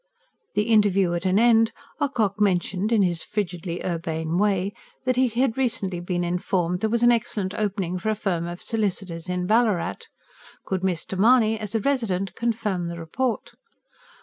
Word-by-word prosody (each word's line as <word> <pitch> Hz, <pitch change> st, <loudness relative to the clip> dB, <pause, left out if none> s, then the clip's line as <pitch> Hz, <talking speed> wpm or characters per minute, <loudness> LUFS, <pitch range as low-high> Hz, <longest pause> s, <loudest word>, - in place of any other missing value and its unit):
The 210 Hz, -, +3 dB
interview 205 Hz, -5 st, +3 dB
at 175 Hz, +2 st, -1 dB
an 185 Hz, +1 st, +3 dB
end, 225 Hz, 0 st, +5 dB, 0.3 s
Ocock 220 Hz, -8 st, 0 dB
mentioned, 195 Hz, +1 st, +1 dB
in 220 Hz, -3 st, +4 dB
his 175 Hz, -3 st, 0 dB
frigidly 180 Hz, -4 st, -4 dB
urbane 165 Hz, -1 st, -2 dB
way, 200 Hz, -1 st, +1 dB, 0.3 s
that 255 Hz, -1 st, +1 dB
he 255 Hz, +1 st, +3 dB
had 240 Hz, +1 st, 0 dB
recently 195 Hz, -8 st, 0 dB
been 175 Hz, 0 st, -2 dB
informed 180 Hz, 0 st, 0 dB
there 220 Hz, +2 st, 0 dB
was 235 Hz, +1 st, +1 dB
an 240 Hz, -, +7 dB
excellent 215 Hz, -5 st, -1 dB
opening 195 Hz, -4 st, -2 dB
for 220 Hz, -, -2 dB
a 215 Hz, -, +1 dB
firm 175 Hz, -5 st, -2 dB
of 175 Hz, +1 st, -7 dB
solicitors 190 Hz, -6 st, -2 dB
in 180 Hz, 0 st, -1 dB
Ballarat: 210 Hz, -, +1 dB, 0.6 s
could 190 Hz, -2 st, -2 dB
Mr. 185 Hz, 0 st, -2 dB
Mahony, 225 Hz, 0 st, +4 dB
as 215 Hz, 0 st, -5 dB
a -, -, +3 dB
resident, 200 Hz, -8 st, 0 dB
confirm 215 Hz, -6 st, -1 dB
the 170 Hz, 0 st, -5 dB
report? 220 Hz, +9 st, -2 dB
195 Hz, 165 wpm, -24 LUFS, 180-225 Hz, 0.6 s, an